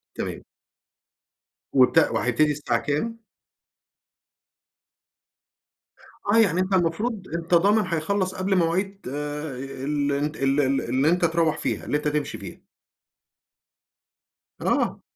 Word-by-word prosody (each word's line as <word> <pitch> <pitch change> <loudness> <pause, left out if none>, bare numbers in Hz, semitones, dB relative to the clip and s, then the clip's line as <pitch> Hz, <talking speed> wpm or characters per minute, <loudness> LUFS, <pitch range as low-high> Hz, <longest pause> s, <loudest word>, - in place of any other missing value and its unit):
تمام. - - -5 1.3
وت 130 -2 +4
وهيبتدي 150 +5 +2
الساعة 140 -5 -1
كام؟ 225 - -3 3.0
آه، 205 +3 +2
يعني 190 -6 +4
أنت 185 +1 -1
المفروض 190 +4 0
أنت 170 +1 -3
ضامن 205 +3 +3
هيخلّص 185 +3 -1
قبل 190 +1 0
مواعيد 185 +3 0
ال 145 0 -3
أنت 145 +2 -1
ال 135 +1 +1
ال 135 0 +1
اللي 130 +5 +1
أنت 175 +1 +2
تروّح 165 -1 +1
فيها، - - -3
اللي 150 - 0
أنت 150 0 -3
تمشي 150 -1 -2
فيها. - - -10 2.0
آه. - - 0
160 Hz, 105 wpm, -24 LUFS, 145-185 Hz, 3.0 s, وت